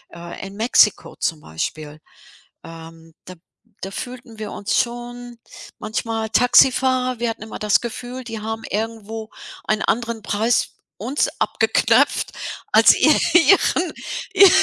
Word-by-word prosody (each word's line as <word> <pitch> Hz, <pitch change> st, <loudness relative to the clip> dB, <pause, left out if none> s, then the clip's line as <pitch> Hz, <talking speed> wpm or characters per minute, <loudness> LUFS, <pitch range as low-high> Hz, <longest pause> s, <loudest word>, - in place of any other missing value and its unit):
Äh, 170 Hz, +3 st, -8 dB
in 195 Hz, -, -11 dB
Mexiko 230 Hz, +3 st, +2 dB
zum 160 Hz, -3 st, -2 dB
Beispiel, 150 Hz, -, -6 dB, 0.6 s
ähm, 165 Hz, 0 st, -12 dB
da 185 Hz, -, -10 dB, 0.5 s
da 195 Hz, -, -6 dB
fühlten 245 Hz, -1 st, -8 dB
wir 210 Hz, -1 st, -5 dB
uns 205 Hz, +6 st, -1 dB
schon 240 Hz, -1 st, -5 dB, 0.4 s
manchmal 220 Hz, 0 st, -3 dB
Taxifahrer, 255 Hz, +1 st, +3 dB
wir 235 Hz, -1 st, 0 dB
hatten 225 Hz, -1 st, -6 dB
immer 220 Hz, -, -8 dB
das 210 Hz, -1 st, +2 dB
Gefühl, 245 Hz, +2 st, -6 dB
die 225 Hz, -2 st, -6 dB
haben 225 Hz, +1 st, -5 dB
irgendwo 220 Hz, 0 st, -4 dB, 0.4 s
ein 215 Hz, 0 st, 0 dB
anderen 230 Hz, -2 st, -2 dB
Preis 225 Hz, +4 st, 0 dB, 0.3 s
uns 255 Hz, +8 st, -1 dB
abgeknöpft -, -, +2 dB, 0.4 s
als -, -, +7 dB
ihren -, -, +4 dB, 1.1 s
ihr 395 Hz, -2 st, +8 dB
225 Hz, 125 wpm, -21 LUFS, 200-240 Hz, 1.1 s, ihr